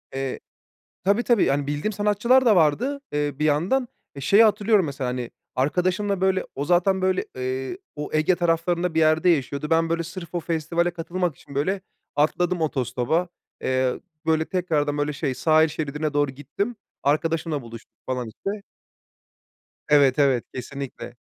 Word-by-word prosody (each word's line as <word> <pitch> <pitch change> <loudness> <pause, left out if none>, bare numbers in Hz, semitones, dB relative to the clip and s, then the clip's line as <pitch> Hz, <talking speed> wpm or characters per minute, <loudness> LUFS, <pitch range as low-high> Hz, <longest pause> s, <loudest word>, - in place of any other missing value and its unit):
Eee, 135 -1 -3 0.6
tabii, 200 +5 +2
tabii, 235 -5 +3
yani 140 0 0
bildiğim 145 +8 -1
sanatçılar 210 +6 +3
da 220 -3 +6
vardı, 230 - +2
eee, 145 0 -1
bir 150 - +1
yandan. 175 - +2 0.3
E, 140 - -7
şeyi 200 +11 +6
hatırlıyorum 210 -2 +3
mesela, 140 -3 -3
hani, 125 -1 -4 0.2
arkadaşımla 185 +8 0
böyle, 190 0 +2
o 140 - -2
zaten 180 +3 +3
böyle, 185 0 +1
ııı, 130 - -3 0.2
o 150 0 -5
Ege 155 +4 +3
taraflarında 170 0 0
bir 160 - +2
yerde 155 +2 +4
yaşıyordu. 145 -2 0
Ben, 165 0 +3
böyle, 165 0 0
sırf 170 +1 -8
o - - +1
festivale 170 +1 0
katılmak 175 -1 -2
için, 140 - -14
böyle, 185 +8 0 0.3
atladım 170 +4 +1
otostopa. 130 +4 0 0.3
Eee, 130 -1 0 0.3
böyle, 160 0 +2
tekrardan, 155 -6 0
böyle, 145 0 -1
şey 140 -2 -2
sahil 155 +2 +4
şeridine 150 -1 -3
doğru 145 -2 +1
gittim. 150 - -4 0.3
Arkadaşımla 155 +1 0
buluştuk, 115 -1 -11
falan, 125 -2 -2
işte. 200 - -5 1.3
Evet, 140 -2 +5
evet, 135 -4 +3
kesinlikle. 135 0 -7
160 Hz, 150 wpm, -24 LUFS, 140-185 Hz, 1.3 s, da